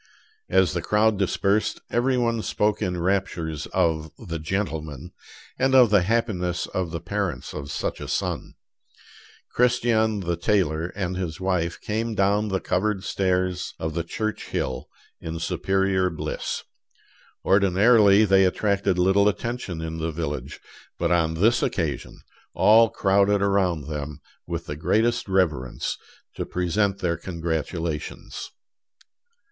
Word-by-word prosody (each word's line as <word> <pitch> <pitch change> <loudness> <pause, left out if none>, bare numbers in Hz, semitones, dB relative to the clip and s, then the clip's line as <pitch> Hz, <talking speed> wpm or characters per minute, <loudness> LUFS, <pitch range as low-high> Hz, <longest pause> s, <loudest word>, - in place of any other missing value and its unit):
As - - +3
the - - -1
crowd 105 -1 +2
dispersed, 100 +2 +1
every 125 +2 +2
one 115 -2 +1
spoke 105 0 0
in 90 -4 -1
raptures 85 -4 -1
of 80 -1 0
the 85 -8 -6
"gentleman" 80 -3 -3 0.5
and 135 0 +3
of 125 -5 +7
the 105 -3 +5
happiness 90 -4 0
of 95 -2 -3
the 85 0 -4
parents 90 -6 -3
of 70 -2 -6
such - - -3
a - - -5
son. - - -3 1.0
Christian 115 -3 +2
the 85 -1 -1
tailor 85 -4 +1
and 95 -2 -2
his 90 -3 -4
wife 90 -3 -1
came 110 +1 -2
down 100 +2 +2
the 95 -2 -1
covered 95 +1 -1
stairs 90 -1 -1
of 80 0 -3
the 85 +1 -1
church 110 +6 -4
hill 65 -1 -3 0.3
in 80 0 -5
superior 95 +2 +1
bliss. 80 - -4 0.8
Ordinarily 100 +2 +5
they 95 -1 +5
attracted 100 0 +1
little 95 +3 +4
attention 105 -5 -4
in 80 0 -5
the 80 +1 -1
village; 75 -3 -4 0.4
but - - 0
on 80 -2 +2
this 110 +8 +3
occasion - - -2 0.3
all 115 +1 +6
crowded 100 0 +2
around 95 -6 +1
them 75 -1 -5 0.3
with 85 0 -4
the 75 - -5
greatest 115 +9 +1
reverence, 80 -10 0 0.4
to - - -1
present 95 +3 0
their 85 -2 0
congratulations. 80 -2 -4
95 Hz, 130 wpm, -24 LUFS, 85-105 Hz, 1.0 s, of